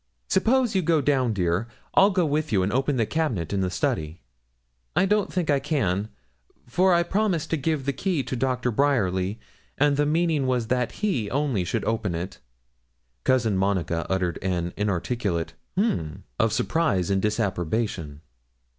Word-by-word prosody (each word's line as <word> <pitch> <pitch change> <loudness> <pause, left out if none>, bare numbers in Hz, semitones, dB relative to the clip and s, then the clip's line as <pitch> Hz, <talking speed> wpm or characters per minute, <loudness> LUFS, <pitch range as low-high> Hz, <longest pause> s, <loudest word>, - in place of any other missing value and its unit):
Suppose 235 +4 +2
you 190 - +2
go 165 -1 +2
down, 135 -4 +2
dear 90 +1 0 0.3
I'll 195 - +6
go 185 -3 +1
with 155 +1 -1
you, 95 -3 +3
and 100 +4 -1
open 135 +2 +1
the 115 - +2
cabinet 115 - -1
in 100 - +1
the 95 - 0
study.' 80 -2 -2 0.8
'I - - +4
don't 210 0 +1
think 175 -5 0
I 140 - +3
can, 110 - -1 0.6
for 185 +10 +2
I 170 -1 +4
promised 190 -3 0
to - - +3
give 150 -1 -1
the 140 - 0
key 175 -3 -1
to 130 - -4
Dr. 125 0 0
Bryerly, 105 -6 +1 0.4
and 145 0 +3
the 145 0 +2
meaning 160 -3 +1
was 125 -3 0
that 125 -2 +1
he 120 - 0
only 135 -7 0
should 90 - -2
open 110 -6 -1
it.' 90 +3 -5 0.9
Cousin 115 -5 +2
Monica 90 -4 0
uttered 90 -2 0
an 90 -2 -1
inarticulate 100 -4 -1 0.2
'H'm!' 85 - -1 0.2
of 115 0 +3
surprise 105 - +1
or 95 - +3
disapprobation. 95 -6 -1
120 Hz, 165 wpm, -25 LUFS, 95-155 Hz, 0.9 s, I'll